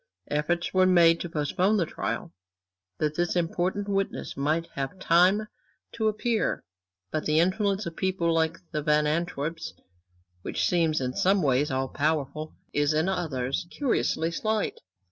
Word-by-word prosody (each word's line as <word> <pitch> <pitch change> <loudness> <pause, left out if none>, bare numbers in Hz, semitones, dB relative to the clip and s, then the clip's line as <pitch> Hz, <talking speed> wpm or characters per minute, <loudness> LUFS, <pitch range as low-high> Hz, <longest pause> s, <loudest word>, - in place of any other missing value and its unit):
Efforts 170 +4 0
were 185 0 +5
made 170 -2 +5
to 175 - -4
postpone 180 +7 +1
the 175 - +2
trial, 110 - -4 0.6
that 150 +4 0
this 175 +3 -1
important 180 +4 -1
witness 195 -1 -2
might 155 +4 0
have 135 +6 -4
time 185 +4 +3 0.4
to 220 -1 -1
appear. 215 +1 0 0.5
But 155 - -2
the 155 +1 +3
influence 195 +3 +1
of 165 - -5
people 185 -3 0
like 165 0 +1
the 155 -3 -1
Van 150 0 +2
Antwerps, 165 0 -2 0.7
which - - -1
seems 165 -4 +2
in 125 -1 -2
some 195 +4 +2
ways 135 +1 +2
all 130 0 -1
powerful, 155 +1 -2 0.2
is 145 +1 +2
in 160 +3 +2
others 150 -5 -2
curiously 200 - 0
slight. 215 +4 -1
165 Hz, 145 wpm, -27 LUFS, 150-185 Hz, 0.7 s, were